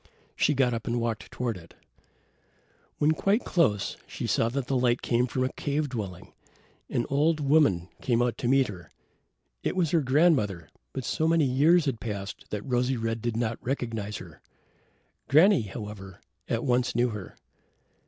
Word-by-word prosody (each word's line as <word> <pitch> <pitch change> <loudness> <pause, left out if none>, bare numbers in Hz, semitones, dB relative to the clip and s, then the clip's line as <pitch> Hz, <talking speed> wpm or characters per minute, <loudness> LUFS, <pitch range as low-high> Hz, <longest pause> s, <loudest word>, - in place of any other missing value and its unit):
She 150 - +2
got 125 -2 +2
up 115 0 -4
and 120 +1 0
walked 115 -1 -3
toward 120 -5 -3
it. 85 -2 -15 1.2
When 150 +1 +3
quite 195 +8 +1
close, 105 - +1
she - - -5
saw 115 - +1
that 135 +1 -2
the 135 - -1
light 125 -1 +2
came 120 +1 +2
from 130 +1 -1
a 130 - -2
cave 145 0 -1
dwelling. 100 -8 -6 0.6
An 120 - 0
old 155 +3 +2
woman 140 - +3
came 120 -2 +1
out 120 -1 +1
to 120 - -1
meet 135 +1 +4
her. 90 -6 -9 0.7
It - - -2
was 175 -5 +1
her 165 - +3
grandmother, 130 - +2 0.2
but 130 - -5
so 160 - 0
many 165 -2 +3
years 150 +6 +4
had 130 -6 -1
passed 100 -3 -6
that 105 -1 -4
Rosy 125 +1 0
red 115 0 -2
did 120 -1 -2
not 115 -1 -2
recognize 115 -5 -3
her. 85 -4 -12 0.9
Granny, 165 - +6
however, 105 -3 -8 0.3
at 115 0 -1
once 125 -2 +1
knew 120 +1 +3
her. 105 -5 -7
120 Hz, 170 wpm, -27 LUFS, 110-140 Hz, 1.2 s, Granny